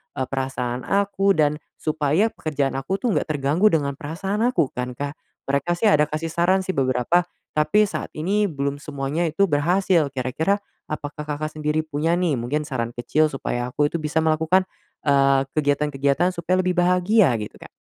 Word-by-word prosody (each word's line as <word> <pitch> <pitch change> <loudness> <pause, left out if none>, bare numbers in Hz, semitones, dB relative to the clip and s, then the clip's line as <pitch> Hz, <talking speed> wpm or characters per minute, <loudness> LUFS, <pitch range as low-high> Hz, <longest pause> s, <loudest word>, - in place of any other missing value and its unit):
eee, 130 - -1
perasaan 130 -2 -3
aku, 200 0 +2
dan 150 0 +2 0.2
supaya 155 +7 +1
pekerjaan 145 -3 -2
aku 185 +9 -2
tuh 240 - +2
nggak - - 0
terganggu 145 +9 +2
dengan 140 -3 +1
perasaan 190 +8 -3
aku 205 - +1
kan, 125 0 -4
Kak? 145 0 -3 0.4
Mereka 140 +5 0
sih 215 - +2
ada 150 0 +4
kasih 160 +1 -3
saran 180 +3 +2
sih 190 - 0
beberapa, 130 +6 +2 0.3
tapi 155 +8 +3
saat - - -5
ini 200 +6 +1
belum 140 -1 -3
semuanya 150 +4 -2
itu 160 +6 +1
berhasil, 170 +1 +2
kira-kira 140 +10 0 0.3
apakah 150 0 -5
Kakak 155 +1 -3
sendiri 155 +1 0
punya 160 +2 0
nih 175 -5 +1
mungkin 145 +6 -1
saran 120 -4 -3
kecil 155 +6 +2
supaya 120 -2 -3
aku 145 +2 +2
itu 170 - -2
bisa 155 +1 0
melakukan, 160 +4 +3 0.4
eee, 140 -1 +4
kegiatan-kegiatan 145 +3 +1
supaya 180 +2 0
lebih 180 - +2
bahagia 180 - +4
gitu, 105 - -6
Kak? - - -11
150 Hz, 170 wpm, -23 LUFS, 140-175 Hz, 0.4 s, ada